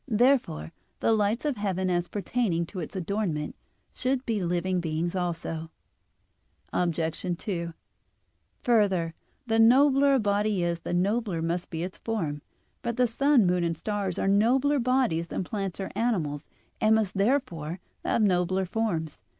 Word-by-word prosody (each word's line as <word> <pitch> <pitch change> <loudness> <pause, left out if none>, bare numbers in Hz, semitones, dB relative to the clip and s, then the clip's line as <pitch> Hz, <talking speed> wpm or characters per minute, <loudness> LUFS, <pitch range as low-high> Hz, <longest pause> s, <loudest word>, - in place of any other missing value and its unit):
Therefore 235 - +2 0.3
the - - +2
lights 215 +4 +1
of 290 -5 0
heaven, 190 -2 -1
as 175 -1 0
pertaining 200 -4 -1
to 185 +3 -7
its 160 - -6
adornment, 180 -5 -2 0.4
should 260 +1 -1
be 220 -5 -1
living 180 +1 0
beings 165 +2 -2
also. 165 -2 -3 1.0
Obj. 170 +1 -1
2: 170 -4 -3 0.9
Further, 195 - +2 0.3
the 225 -1 +1
nobler 275 +4 +6
a - - +3
body 205 -2 +1
is, 170 -1 -1
the 175 - -3
nobler 195 -2 0
must 170 +2 -2
be 165 -1 -3
its 185 +1 -6
form. 165 -11 -2 0.4
But 235 0 -3
the 250 - +4
sun, 260 0 +3
moon, 180 0 +2
and 165 -1 -1
stars 200 -2 -2
are - - 0
nobler 255 +8 +3
bodies 245 -10 +1
than 185 - -3
plants 195 -1 -4
or 195 - -4
animals, 160 -11 -1 0.3
and 220 0 +5
must 215 -3 0
therefore 195 - 0 0.2
have 225 - +1
nobler 185 -1 +2
forms. 175 - -2
195 Hz, 150 wpm, -27 LUFS, 170-225 Hz, 1.0 s, nobler